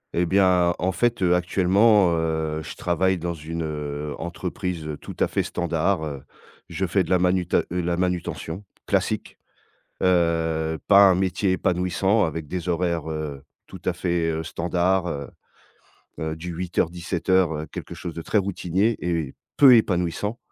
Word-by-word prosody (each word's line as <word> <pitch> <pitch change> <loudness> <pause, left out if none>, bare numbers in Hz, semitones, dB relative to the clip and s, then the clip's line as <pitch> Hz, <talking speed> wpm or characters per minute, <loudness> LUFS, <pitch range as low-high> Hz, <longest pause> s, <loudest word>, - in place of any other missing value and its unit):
Et 85 0 +2
bien 90 -2 +3
en 95 +2 0
fait, 120 +3 0
heu, 90 -1 +4
actuellement, 95 +2 +4
heu, 80 -1 -1
je - - -8
travaille 95 +2 +1
dans 85 +1 -3
une 80 +1 -5 0.6
entreprise 85 -2 -4
tout - - -8
à - - +3
fait - - 0
standard, 85 0 -1
heu, 70 -3 -6 0.5
je 95 - -2
fais 95 +2 +1
de - - -9
la 90 - +4
manuta 90 -1 +1
heu, 90 0 -1
la 85 0 -1
manutention 90 0 -3 0.2
classique, - - -1 0.6
heu, 80 -3 +1
pas 100 -1 +8
un 90 - +4
métier 95 +1 +1
épanouissant 95 +4 +1
avec 80 -2 -3
des 90 +2 -4
horaires, 85 -2 -1
heu, 75 -3 -5 0.2
tout - - -11
à - - +1
fait, 85 -2 -1
heu, 80 0 -2
standard, 90 +2 0
heu 70 -4 -4 0.9
heu, 80 0 -3
du 85 +2 -6
8 90 +1 -6
heures 85 - +3
17 85 0 -5
heures 85 -5 +2
quelque - - -7
chose 85 - -6
de - - -5
très 110 - -2
routinier 100 +3 0
et 85 -6 -2 0.2
peu 135 -4 +8
épanouissant 100 +2 0
90 Hz, 160 wpm, -24 LUFS, 80-95 Hz, 0.9 s, pas